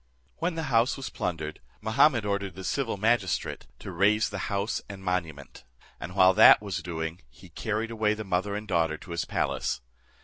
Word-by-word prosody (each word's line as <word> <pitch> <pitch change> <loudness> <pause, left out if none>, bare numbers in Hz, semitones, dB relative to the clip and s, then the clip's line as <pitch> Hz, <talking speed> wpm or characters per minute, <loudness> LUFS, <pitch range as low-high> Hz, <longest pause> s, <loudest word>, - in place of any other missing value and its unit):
When 170 +1 -1
the 165 - -3
house 115 +5 +3
was 135 - -6
plundered, 80 -3 -4 0.2
Mahummud 115 0 +3
ordered 100 -2 -2
the 95 - -8
civil 125 0 -1
magistrate 110 -2 0
to 95 - -8
raze 105 +5 +3
the 100 -2 -5
house 100 +2 -1
and 95 -1 -9
monument; 85 -9 -4 0.4
and 90 +3 -7
while 95 -1 +6
that 110 +3 +8
was 95 -5 -4
doing, 80 0 -5
he 90 +8 -16
carried 110 +6 -3
away 110 -2 +1
the 110 - -5
mother 95 +1 -1
and 105 +1 -5
daughter 80 -4 +1
to 90 - -12
his 85 - -2
palace. - - -1
100 Hz, 180 wpm, -27 LUFS, 90-110 Hz, 0.4 s, that